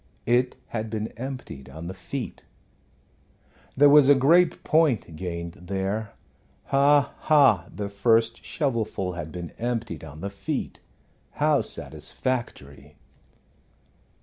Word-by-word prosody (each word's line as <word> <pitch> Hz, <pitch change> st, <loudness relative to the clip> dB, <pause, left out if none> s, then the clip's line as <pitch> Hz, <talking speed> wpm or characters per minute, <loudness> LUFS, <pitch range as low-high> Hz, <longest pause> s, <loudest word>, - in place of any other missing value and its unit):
It 125 Hz, +2 st, +2 dB
had 110 Hz, -1 st, -3 dB
been 110 Hz, 0 st, -3 dB
emptied 125 Hz, -, -8 dB
on 80 Hz, +2 st, -9 dB
the 90 Hz, -, -5 dB
feet. 115 Hz, +8 st, -6 dB, 1.3 s
There 145 Hz, +2 st, +7 dB
was 145 Hz, -1 st, +7 dB
a 145 Hz, -, +8 dB
great 165 Hz, +6 st, +4 dB
point 145 Hz, -, +2 dB
gained 85 Hz, 0 st, -5 dB
there 100 Hz, +3 st, -2 dB, 0.5 s
ha, 140 Hz, 0 st, +3 dB
ha! 140 Hz, -, +4 dB
the 100 Hz, -1 st, -4 dB
first 115 Hz, +3 st, +1 dB
shovelful 110 Hz, -, -2 dB
had 80 Hz, -3 st, -6 dB
been 85 Hz, -1 st, -7 dB
emptied 115 Hz, -4 st, -3 dB
on 75 Hz, 0 st, -10 dB
the 100 Hz, +2 st, -4 dB
feet. 100 Hz, -, -4 dB, 0.5 s
How -, -, +2 dB
satisfactory! 75 Hz, -, -4 dB
110 Hz, 115 wpm, -25 LUFS, 90-135 Hz, 1.3 s, a